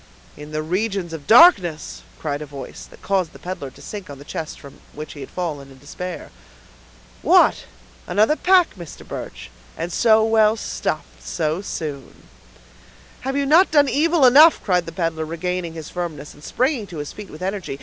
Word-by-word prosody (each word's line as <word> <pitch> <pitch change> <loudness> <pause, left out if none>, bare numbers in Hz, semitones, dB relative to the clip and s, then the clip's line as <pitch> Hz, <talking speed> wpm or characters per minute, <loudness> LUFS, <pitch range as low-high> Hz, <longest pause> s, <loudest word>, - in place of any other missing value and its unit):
"In 150 0 -10
the 155 0 -2
regions 185 0 -2
of 150 -3 -8
darkness!" 195 - +5 0.2
cried 145 -1 -3
a 150 - -6
voice 140 -2 -9
that - - -18
caused 185 -4 0
the - - -12
peddler 180 -6 -6
to - - -16
sink 205 -5 -8
on 140 - -8
the 140 - -13
chest 160 0 -6
from 140 -2 -14
which 150 0 -8
he 145 - -11
had 135 - -8
risen, 145 -6 -4
in 135 - -15
despair. 180 +6 -7 0.9
"What! - - +4 0.4
another 215 +9 +3
pack, 365 +1 +3
Mr. 170 -5 -11
Birch, - - -8 0.3
and 170 +1 -4
so 220 -2 +4
well 220 -1 +4
stuffed - - -4
so 160 +1 -2
soon!" 150 -8 -7 1.0
"Have 270 +2 -3
you 280 - +1
not 325 +7 +5
done 290 -4 +4
evil 310 +2 +3
enough?" 295 +6 +7
cried 180 -4 +1
the - - -5
peddler, 165 -3 -2
regaining 170 +1 -3
his 160 -2 -8
firmness, 160 -5 -6
and 145 - -18
springing 255 - -1
on 165 - -7
his 145 -1 -6
feet 210 -2 -10
with 155 +4 -10
energy. 190 -7 -4
175 Hz, 180 wpm, -21 LUFS, 150-220 Hz, 1.0 s, enough